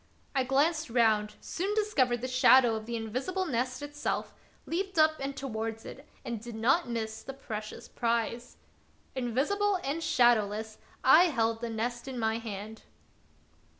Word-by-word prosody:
I 265 -2 +2
glanced 295 +4 +1
round, 220 -3 +2
soon 390 +4 -2
discovered 265 - +1
the 255 - -2
shadow 255 -1 +6
of 220 0 -6
the 235 - -3
invisible 255 - -2
nest 255 -1 -2
itself, 290 0 -3 0.3
leaped 380 +2 -3
up 310 0 +5
and 275 0 -4
towards 225 -3 -4
it, 275 +3 -10 0.2
and 235 -3 -4
did 235 0 -8
not 250 +6 +2
miss 220 -2 -3
the 270 - -7
precious 215 -5 -7
prize. 235 0 -2 0.6
Invisible 285 - 0
and 285 +5 -2
shadowless, 220 -6 +2 0.2
I 315 +7 +7
held 230 -8 0
the 235 - -3
nest 235 +3 -3
in 260 -2 -5
my 220 -1 0
hand. 220 -1 -7
245 Hz, 150 wpm, -30 LUFS, 225-285 Hz, 0.6 s, I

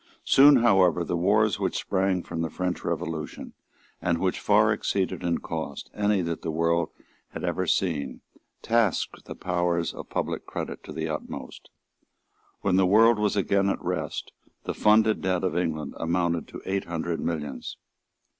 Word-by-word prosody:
Soon 140 +2 +7
however 90 -7 +4
the 85 - -2
wars 100 +4 +2
which - - -1
sprang 95 -2 0
from 80 - -4
the 80 - -1
French 90 +1 -3
Revolution, 80 -1 -4 0.5
and 85 -1 +1
which 95 +1 -1
far 105 +1 +4
exceeded 100 -2 -1
in 85 -1 0
cost 80 -4 -6
any 105 -2 +1
that 85 -1 -3
the - - -4
world 85 +1 +1 0.4
had - - -6
ever 90 +1 -1
seen, 80 -5 -1 0.4
tasked 115 -6 0
the - - -8
powers 85 -1 -1
of - - -9
public - - -3
credit - - -5
to - - -8
the 80 0 -3
utmost. 75 -2 -7 0.9
When 95 -2 +2
the 95 -1 +4
world 110 +3 +5
was 105 -1 +1
again 100 0 +2
at - - -1
rest - - -3 0.3
the - - -3
funded 110 0 +4
debt 95 -1 0
of 90 -3 0
England 80 -4 -2
amounted 85 -1 0
to - - -10
eight 95 0 -1
hundred 85 0 -3
millions. 75 -4 -4
90 Hz, 160 wpm, -26 LUFS, 85-100 Hz, 0.9 s, Soon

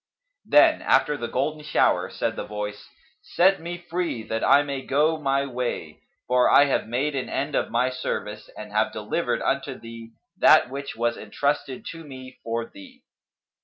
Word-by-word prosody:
Then, - - +5
after 150 - +3
the 120 -4 -4
golden 155 +4 -2
shower, 150 - +2
said - - -2
the - - -4
Voice, 105 0 -6 0.3
"Set 190 0 +2
me 175 +1 -5
free, 175 -8 -3
that 110 +1 -3
I 140 +1 +5
may 140 -2 -4
go 150 +4 +1
my 140 -1 +1
way; 120 - -4 0.3
for 125 0 +4
I 145 - +7
have 135 - 0
made 135 +6 -1
an 130 - -3
end 140 +2 -2
of - - 0
my 125 +2 +1
service 105 -4 -5
and 105 -1 -8
have 110 +1 +1
delivered 105 -1 -2
unto - - -1
thee 115 0 -11 0.3
that 125 - +6
which 140 +1 -6
was 120 +1 -1
entrusted 140 +3 -2
to 165 -1 -10
me 130 -3 -11
for 115 0 -2
thee." 260 - -15
130 Hz, 170 wpm, -24 LUFS, 115-150 Hz, 0.3 s, I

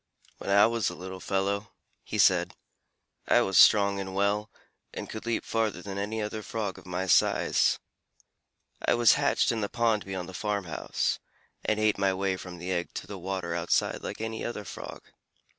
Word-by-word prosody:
"When - - -6
I 100 +1 +7
was 115 -1 +1
a 90 - -7
little 95 +1 -7
fellow," 100 +3 -1 0.3
he - - -4
said, - - +4 0.7
"I - - +5
was 95 - -1
strong 100 0 +6
and 95 -1 -5
well, 100 +2 +1 0.5
and - - -5
could 110 +1 -7
leap 115 - -1
farther 110 -5 -1
than 100 -1 -5
any 105 +2 -2
other 110 +1 -4
Frog 105 -3 -4
of - - -16
my 90 +1 -2
size. 90 - +3 1.1
I - - +3
was 120 -1 +6
hatched - - +2
in 115 -2 -2
the 100 - -1
pond 115 -3 +1
beyond 95 -2 -5
the 95 - -9
farm 100 +2 -2
house, 80 -2 -2 0.4
and 110 0 0
ate 110 -2 +2
my 95 -1 +2
way 95 0 0
from 90 -1 -8
the 90 +2 -5
egg 85 -1 -2
to - - -5
the 100 -2 -8
water 90 -2 -3
outside 85 -1 0
like - - -6
any 110 0 -4
other 105 -3 -4
Frog. - - -8
100 Hz, 190 wpm, -28 LUFS, 95-110 Hz, 1.1 s, I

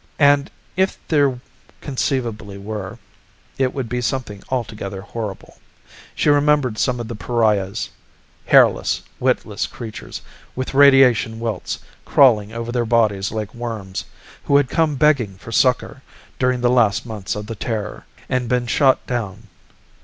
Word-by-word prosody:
And 145 0 +4 0.3
if 190 +1 +1
there 140 -5 +2 0.4
conceivably 120 -7 -3
were, 105 +1 -6 0.6
it 130 -1 +2
would 135 -4 -4
be 125 +2 -2
something 115 -5 -3
altogether 105 -6 -4
horrible. 105 -1 -7 0.6
She - - 0
remembered 145 -5 +3
some 125 -2 +1
of 120 - -4
the 120 - -5
pariahs 105 -3 0 0.6
hairless, - - +4 0.2
witless - - 0
creatures, 110 -2 -8 0.3
with 130 +1 -4
radiation 135 -5 +5
welts 115 -5 -3 0.3
crawling 110 -6 +4
over 115 +1 -5
their 120 -1 0
bodies 110 -4 +2
like 105 -1 -4
worms, 110 -5 -5 0.4
who 140 - +4
had 140 -3 +2
come 160 -3 +1
begging 130 -8 +2
for 115 - -11
succor 130 +3 +1 0.4
during 125 -1 +1
the 120 0 +3
last 115 -2 +3
months 110 -5 -4
of 105 0 -5
the 115 - -5
Terror 105 -1 -4 0.2
and 125 -2 -1
been 125 -1 +1
shot 130 +2 +3
down. 110 -3 -4
120 Hz, 140 wpm, -20 LUFS, 105-130 Hz, 0.6 s, radiation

